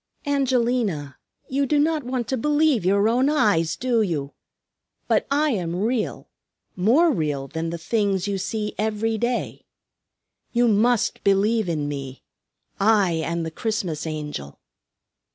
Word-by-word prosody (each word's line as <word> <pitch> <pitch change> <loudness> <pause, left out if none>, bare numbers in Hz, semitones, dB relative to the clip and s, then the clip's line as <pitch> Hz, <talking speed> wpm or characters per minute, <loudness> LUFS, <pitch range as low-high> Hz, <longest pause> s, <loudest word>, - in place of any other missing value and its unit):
"Angelina, 245 - 0 0.3
you 275 +1 0
do 300 - +2
not 305 0 +1
want 250 -1 -3
to 265 - +1
believe 295 - +2
your 200 +3 +3
own 250 +5 +2
eyes, 200 - +2
do 240 -2 +1
you? 150 -8 -2 0.7
But - - +1
I 295 +2 +2
am 175 -7 -2
real; 220 +4 -2 0.5
more 255 - +4
real 150 - -2
than 165 +3 -4
the 170 - -4
things 200 +1 0
you 200 -1 -1
see 210 +2 -3
every 220 +1 -1
day. 240 +1 -2 0.9
You 240 0 +3
must 230 +2 +2
believe 200 +1 +2
in 150 -3 -1
me. 135 -2 -6 0.6
I 205 -3 +4
am 165 +1 -2
the 160 - -4
Christmas 180 -6 -3
Angel." 150 - -6
210 Hz, 135 wpm, -23 LUFS, 165-245 Hz, 0.9 s, more